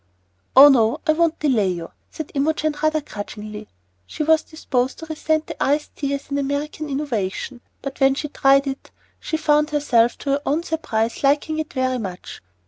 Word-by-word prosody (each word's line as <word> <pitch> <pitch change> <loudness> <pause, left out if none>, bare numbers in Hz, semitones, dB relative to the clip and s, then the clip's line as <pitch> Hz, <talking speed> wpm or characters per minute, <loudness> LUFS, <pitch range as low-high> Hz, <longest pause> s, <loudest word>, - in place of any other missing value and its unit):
"Oh, 275 +2 +11
no. 230 -4 +3
I 310 - +4
won't 335 0 +1
delay 250 -10 +2
you," 170 -1 -7 0.2
said 315 - -7
Imogen, 310 +2 0
rather 310 0 +2
grudgingly. 210 -3 -8 0.4
She - - -3
was 320 0 +4
disposed 260 -5 -2
to 325 - -8
resent 315 0 -1
the - - -4
iced 295 +2 0
tea 280 -1 -1
as 280 0 -9
an 280 - 0
American 290 +2 -3
innovation, 250 -4 -3 0.2
but 275 -1 -6
when 270 -1 +4
she 300 - -3
tried 275 0 +4
it 275 0 -5 0.3
she 315 - -2
found 300 -1 +2
herself, 255 -6 +2
to 280 - -3
her 280 +1 +1
own 305 +4 0
surprise, 290 -10 -2
liking 295 +3 +2
it 310 - -4
very 255 -1 -1
much. 190 -5 -7
280 Hz, 180 wpm, -22 LUFS, 255-310 Hz, 0.4 s, Oh